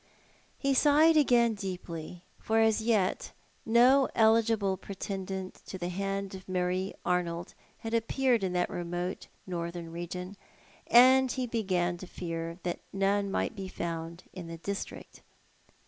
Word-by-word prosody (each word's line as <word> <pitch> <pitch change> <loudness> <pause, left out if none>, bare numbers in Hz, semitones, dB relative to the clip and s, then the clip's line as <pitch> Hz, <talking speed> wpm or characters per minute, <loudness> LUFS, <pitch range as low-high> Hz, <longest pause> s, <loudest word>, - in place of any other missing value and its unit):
He 275 -1 +1
sighed 300 +4 +5
again 240 -6 +4
deeply, 180 -4 -6 0.2
for 225 0 +1
as 220 0 +3
yet 215 -5 0 0.3
no 250 +4 +5
eligible 220 -3 +3
pretendant 190 0 -6
to 190 - -6
the 175 -1 -3
hand 195 +1 -3
of 190 0 -10
Marie 185 +1 -1
Arnold 175 -1 -1 0.2
had 225 0 -6
appeared 235 0 +1
in 185 -1 -1
that 180 0 0
remote 175 +1 -4 0.2
northern 170 -2 -5
region; 180 +3 -6 0.5
and 260 +1 +6
he 255 -1 -2
began 185 -7 0
to 185 - -9
fear 165 -1 -5
that 175 -1 -2
none 195 +1 +1
might 210 - -1
be 195 -2 -5
found 170 -1 -5
in 180 -3 -7
the 165 0 -7
district. 200 +4 -6
190 Hz, 135 wpm, -30 LUFS, 175-225 Hz, 0.5 s, and